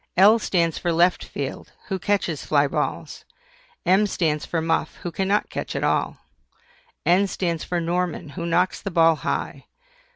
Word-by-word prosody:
L 210 +5 +7
stands 170 -6 0
for 175 - 0
LEFT 175 +2 +3
FIELD, - - -6 0.2
who 190 -2 -2
catches 175 -6 -1
FLY 145 -1 +3
BALLS. - - -3 0.6
M 195 +3 +4
stands 155 -6 -1
for 165 - -1
MUFF, 165 -1 -1
who 175 - -3
cannot 195 +4 0
catch - - -4
at - - -2
all. - - 0 0.9
N 185 +4 +4
stands 170 -4 -2
for 175 - -2
NORMAN, 175 -2 -2
who 170 +4 -5
knocks 180 +2 +1
the 200 - -4
ball 165 -3 +4
high. - - -4
175 Hz, 160 wpm, -23 LUFS, 165-190 Hz, 0.9 s, L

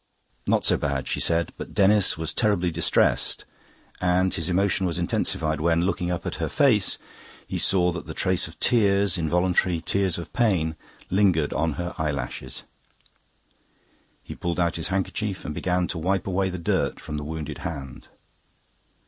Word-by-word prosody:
"Not - - +2
so - - +6
bad," 70 -2 -2
she - - -1
said. 85 0 +1
But - - -8
Denis 100 -2 +4
was 80 -1 -3
terribly 100 -6 +1
distressed, 85 +1 +1 0.5
and 90 +1 +2
his 80 0 -1
emotion 95 +1 +1
was 85 -2 -2
intensified 80 -3 -1
when, 85 +1 +2
looking 90 -1 -1
up 90 -1 -3
at - - -3
her - - -1
face, 130 -10 +3 0.5
he - - -3
saw 90 -2 +3
that 85 -1 -6
the - - -6
trace 90 -3 +1
of 80 - -14
tears, 100 -5 +3
involuntary 90 +1 +1
tears 95 +2 0
of 85 - -8
pain, 90 -10 +1 0.4
lingered 90 -6 +2
on 80 -1 0
her 85 +4 -4
eyelashes. 70 -4 -3 1.6
He - - -8
pulled 85 0 -3
out 85 -1 +1
his 80 - -2
handkerchief 95 +1 -2
and 75 - -3
began 90 +2 0
to 85 - -3
wipe 95 +3 0
away 95 0 0
the 90 - -5
dirt 85 - 0
from 75 - -6
the 75 - -4
wounded 75 -1 -5
hand. 70 -7 -7
90 Hz, 165 wpm, -25 LUFS, 80-95 Hz, 1.6 s, so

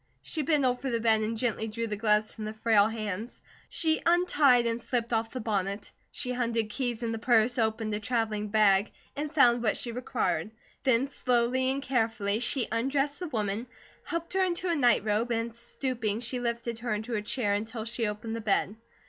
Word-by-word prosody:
She 315 - -3
bent 295 -1 +2
over 250 +1 0
the 235 -2 0
bed 220 -1 +3
and 220 +1 -1
gently 225 -1 -1
drew 230 +2 -3
the 215 -2 -3
gloves 210 0 +2
from 215 - -6
the 215 +1 -5
frail 215 -2 +4
hands. 220 0 -5 0.3
She 315 -1 +1
untied 295 -8 +4
and 230 0 -1
slipped 240 -2 -2
off 225 0 +1
the 255 - -5
bonnet. 200 -3 -2 0.2
She 250 - -3
hunted 230 -3 -1
keys 245 -1 -2
in 230 - -1
the 225 - -3
purse, 240 +1 +3
opened 220 -1 0
a 210 - -1
travelling 215 -2 -1
bag, 205 -1 +3 0.2
and 295 +1 -3
found 245 -6 +5
what 225 - +1
she 235 - -4
required. 225 -7 -1 0.3
Then 260 0 +3
slowly 255 -1 +1
and 270 +1 -1
carefully, 225 -5 0
she 250 +1 +1
undressed 275 +5 0
the 360 - -4
woman, 220 -3 -2 0.4
helped 335 +1 -4
her 380 0 +3
into 360 0 -1
a - - +1
night 245 -7 +3
robe, 220 +3 0
and 230 0 -1
stooping 235 -2 -3
she 245 +1 -2
lifted 235 -1 -3
her 240 0 -3
into 220 +3 -5
a 210 - 0
chair 210 -1 -1
until 220 +2 -3
she 230 -1 -2
opened 215 +2 -4
the 230 - -4
bed. 210 0 0
230 Hz, 200 wpm, -29 LUFS, 215-250 Hz, 0.4 s, found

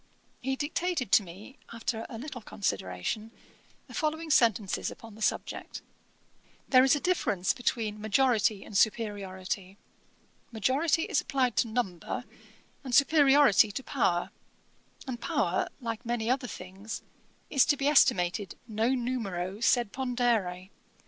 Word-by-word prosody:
He 265 +1 -1
dictated 305 0 -2
to - - +7
me, 200 +8 -12
after 230 0 -3
a 235 - -7
little 255 0 -7
consideration, 100 - -3 0.6
the - - -14
following 315 0 -2
sentences 220 -7 +2
upon 225 -2 -11
the 220 - -14
subject: - - -2 0.9
'There 255 -1 +7
is 270 +2 +5
a - - -1
difference 210 - +1
between 220 -3 -2
majority 215 -2 +2
and 205 - -11
superiority; 195 -3 -1 0.7
majority 275 - +1
is - - +1
applied 255 -4 0
to - - +3
number, 220 -7 -3 0.6
and 255 -3 -1
superiority 280 -7 +5
to 265 - -5
power; 185 -12 0 0.7
and 250 -4 -5
power, 180 -5 0
like 230 -2 -4
many 235 -1 -1
other 255 -1 0
things, 190 +2 -8 0.5
is 275 - +5
to 290 - +3
be 275 - 0
estimated 190 - +3
non 235 +3 0
numero 195 -6 -3
sed 235 -2 +2
pondere. 235 -8 -1
230 Hz, 130 wpm, -29 LUFS, 200-265 Hz, 0.9 s, to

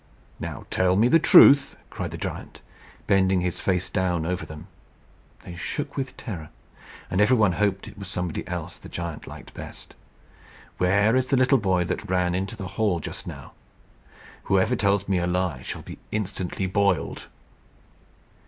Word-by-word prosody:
"Now - - -6
tell 95 0 +2
me 110 +5 +4
the 165 - +6
truth," 140 -3 +7 0.2
cried - - -4
the - - -7
giant, - - -6 0.4
bending 95 -2 +3
his 90 -1 -2
face 90 -1 0
down 90 -4 0
over 90 +2 -3
them. 75 +2 -9 0.8
They 90 - -9
shook 135 - -4
with 135 -2 -4
terror, 85 -10 -7 0.6
and 90 +3 +2
every 125 +4 +5
one 105 -4 +4
hoped 100 +2 0
it 105 -1 -11
was 100 - -7
somebody 90 -3 -3
else - - -5
the - - -12
giant 85 -3 -6
liked - - -11
best. - - -10 0.9
"Where 100 +5 +3
is 130 0 +2
the 135 - +2
little 130 +1 +4
boy 95 -4 +2
that 90 - -4
ran 90 -1 +1
into 95 +2 -2
the 95 - -5 0.2
hall 100 -6 +2
just - - -6
now? - - -8 0.9
Whoever 95 +6 +2
tells 100 -2 +1
me 95 -2 +1
a 85 - 0
lie 90 -7 -1
shall - - -6
be - - -10
instantly 95 -2 -2
boiled." 100 -1 0
95 Hz, 165 wpm, -25 LUFS, 90-105 Hz, 0.9 s, truth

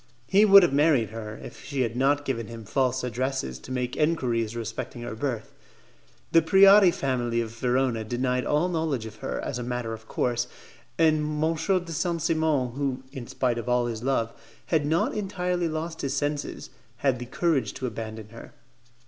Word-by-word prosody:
He 200 - +5
would 200 -2 +9
have 155 - +2
married 140 -7 +3
her 110 -1 -7
if - - -10
she 140 -2 -3
had 115 -2 -1
not 145 +3 +2
given 115 -5 -2
him 115 -1 -9
false 130 +3 0
addresses 125 - -2
to 125 - -11
make 125 -1 -2
enquiries 120 -8 0
respecting 115 +1 -5
her - - -5
birth. 130 +2 -4 0.8
The 165 - +6
Preati 195 +3 +7
family 125 -7 -1
of 115 -1 -2
Verona 125 0 0
denied 125 +3 -1
all 150 +4 +1
knowledge 160 -9 -1
of 110 0 -9
her, - - -4
as 125 - -4
a - - -3
matter 120 -2 -3
of 110 0 -10
course, 120 0 -1 0.5
and 155 -1 +4 0.2
M. 165 +1 +2
de 180 +1 0
Saint 170 +1 -1
Simon, 155 -6 +1
who, 135 0 -3
in 125 -3 -7
spite 120 -2 -1
of 115 - -5
all 125 0 +2
his 115 -2 -4
love, 120 -3 0 0.3
had 155 -3 +1
not 160 +3 +1
entirely 180 -4 -1
lost 160 +1 -4
his 140 -1 -2
senses, 145 +1 -3 0.3
had 130 -1 +1
the 125 - -6
courage 135 -5 0
to 130 - -4
abandon 110 -2 -6
her. 115 +1 -12
130 Hz, 180 wpm, -26 LUFS, 115-155 Hz, 0.8 s, would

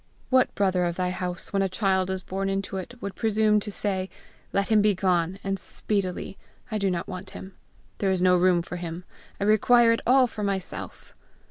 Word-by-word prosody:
What 255 0 +3
brother 190 -3 +2
of 170 -1 -1
thy 180 0 -1
house, 180 0 -5
when 195 - +2
a 195 - +1
child 190 -1 +1
is 190 -1 -2
born 195 +1 -3
into 195 0 -2
it, 190 +6 -7
would 200 - -4
presume 215 0 +2
to 210 0 -5
say, 190 -2 -2 0.4
'Let 200 0 0
him 215 -2 +5
begone, 185 -3 +1
and 195 0 -2
speedily! 195 -1 -3 0.3
I 215 - -1
do 200 -1 +1
not 175 -2 -2
want 185 -1 -7
him! 190 0 -10 0.5
There 195 - +1
is 190 -1 +1
no 180 0 +4
room 180 -1 +3
for 180 - -6
him! 170 0 -6 0.4
I - - -1
require 230 +3 +5
it 230 - +1
all 260 +1 +6
for 220 -3 -6
myself!' 195 -2 -4
195 Hz, 200 wpm, -26 LUFS, 185-210 Hz, 0.5 s, all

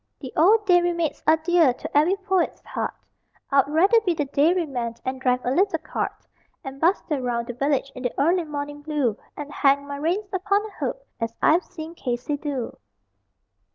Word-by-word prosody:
The 260 -3 -8
old 420 +6 +5
time 360 -2 +6
dairy 350 0 +1
maids 330 -4 -2
are 315 +1 +6
dear 325 -4 +3
to - - -8
every 315 +6 +4
poet's 380 -3 0
heart - - -4 0.6
I'd 275 -1 +4
rather 380 +10 +4
be 360 -6 0
the 295 - -1
dairy 320 +6 +2
man 240 -5 -4
and 260 0 -3
drive 250 -1 +1
a 250 - +1
little 380 +9 +2
cart, - - -4 0.4
And 270 -1 -8
bustle 325 -4 +1
round 240 -2 -2
the 245 - -5
village 275 +2 0
in 255 - -9
the 245 -2 -2
early 340 +4 +2
morning 290 -1 -5
blue, 290 -7 0 0.2
And 295 0 -7
hang 280 0 +3
my 285 0 -6
reins 345 +8 -1
upon 400 +2 +1
a 435 - -8
hook, - - -4
as 230 0 -3
I've 340 +4 +4
seen 325 -2 -8
Casey 255 -2 -3
do. 280 -5 -4
295 Hz, 190 wpm, -24 LUFS, 270-350 Hz, 0.6 s, time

